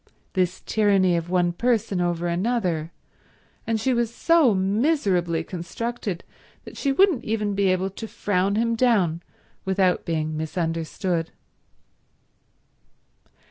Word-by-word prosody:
This 185 -1 0
tyranny 195 -4 +3
of 170 0 -2
one 175 -1 +2
person 220 -3 0
over 175 -1 -1
another! 175 -3 -1 0.8
And 225 -1 0
she 255 +4 +1
was 235 -1 0
so 310 - +3
miserably 190 - +1
constructed 190 +3 -5 0.4
that - - -10
she 280 - 0
wouldn't 360 -2 +3
even 210 -2 -1
be 200 0 +1
able 185 +1 +1
to 225 +4 -7
frown 200 -1 0
him 230 +1 +1
down 200 -9 +2 0.4
without 190 -1 +1
being 155 -1 -2
misunderstood. 165 +1 -2
190 Hz, 115 wpm, -24 LUFS, 175-225 Hz, 0.8 s, tyranny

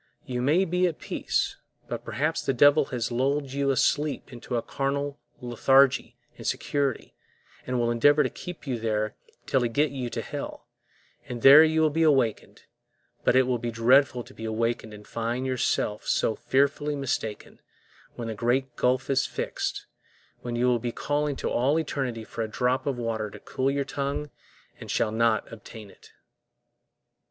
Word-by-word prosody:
You 125 -4 -3
may 155 +9 +3
be 180 +1 +1
all - - +3
at 160 - -9
peace, - - -2 0.3
but - - -5
perhaps 155 +4 -1
the 135 - 0
devil 145 +3 +6
has 120 -2 -3
lulled 135 +2 0
you 140 0 0
asleep 140 0 0
into 120 +1 -5
a 115 - -2
carnal 140 +1 -2 0.2
lethargy 130 +2 +3 0.2
and - - -6
security, 140 -4 -1 0.5
and 125 -1 -1
will 120 0 +1
endeavor 145 +6 +4
to - - -1
keep 180 -3 -9
you 125 -4 -2
there 110 -1 -1 0.3
till 135 - +1
he 120 - 0
get 145 +5 +1
you 130 -3 -4
to - - -4
hell, - - -6 0.6
and 120 -2 -6
there 140 +3 +10
you 160 0 +2
will 155 -1 +3
be 165 +3 0
awakened; 135 -9 +1 0.6
but - - +3
it 130 - +6
will 125 -1 -1
be 120 0 -3
dreadful 125 +2 +3
to - - -16
be 110 - -10
awakened 115 0 -2
and 105 0 -12
find 120 +3 -2
yourselves 125 -4 -1
so 110 - +2
fearfully 140 +2 +1
mistaken, 120 -6 -4 0.5
when 120 - -5
the 110 - -3
great 120 +3 0
gulf 125 +1 +1
is 135 0 +1
fixed, - - -3 0.6
when 120 -1 -4
you 120 +1 +1
will 125 -1 +3
be 120 +1 -3
calling 145 +3 -1
to - - -4
all 135 +6 +2
eternity 135 -7 -2
for 115 - -6
a 110 - -1
drop 125 +4 0
of 135 -3 -1
water 115 -3 -2
to - - -11
cool 130 +1 -1
your 140 0 -1
tongue 140 +1 -3 0.5
and - - -10
shall 110 - +1
not 115 -1 +1
obtain 110 -2 -11
it. - - -19
130 Hz, 180 wpm, -26 LUFS, 115-140 Hz, 0.6 s, there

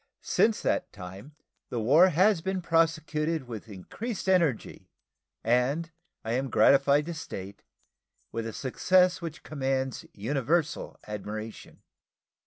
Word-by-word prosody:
Since 220 -1 +2
that - - 0
time 100 +9 -10 0.3
the 120 - -2
war 150 +12 +6
has 185 +2 +3
been 190 0 -2
prosecuted 160 -1 +1
with 115 -2 -8
increased 195 - -6
energy, 170 -10 +1 0.5
and, 130 +8 +1 0.3
I 110 - -2
am 130 +3 -1
gratified 140 +3 +4
to 170 - -4
state, 100 - -8 0.7
with 115 0 -3
a - - -4
success 180 +7 +2
which 165 -2 -7
commands 135 -3 -2
universal 140 +8 -1
admiration.. 105 +1 -7
145 Hz, 115 wpm, -28 LUFS, 115-170 Hz, 0.7 s, war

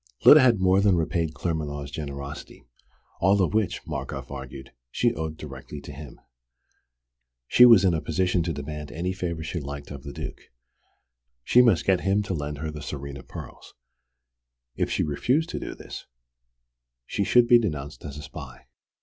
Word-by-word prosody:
Lyda 155 - +10
had 120 -6 +4
more 95 +1 +4
than 100 -2 +4
repaid 80 -1 -1
Claremanagh's 75 -4 -3
generosity, 70 -1 -7 0.5
all 95 +3 +4
of 95 - +1
which, 110 -3 0
Markoff - - -5
argued, 65 0 -8 0.2
she - - +1
owed 80 0 -4
directly 70 0 -8
to 70 - -10
him. 75 -1 -10 1.3
She 125 - +7
was 115 -6 +7
in 90 - +4
a 80 - -1
position 90 +2 0
to 85 +1 -1
demand 75 0 -6
any 90 +3 -2
favour 85 -3 -4
she 85 +2 -3
liked 70 0 -7
of 70 -2 -7
the 70 - -8
Duke. - - -7 1.0
She 125 - +6
must 115 -9 +3
get 95 -2 +3
him 100 +2 +1
to 100 - -3
lend 75 -2 -4
her 80 +2 -4
the 75 - -7
Tsarina 70 -1 -6
pearls. - - -10 1.0
If - - -1
she - - 0
refused 130 - 0
to - - -4
do - - -6
this, - - -9 1.0
she 100 - -1
should 120 +4 +4
be 120 0 +7
denounced 75 -9 -4
as 75 -1 -7
a 75 - -8
spy. 70 -3 -10
80 Hz, 170 wpm, -26 LUFS, 70-95 Hz, 1.3 s, Lyda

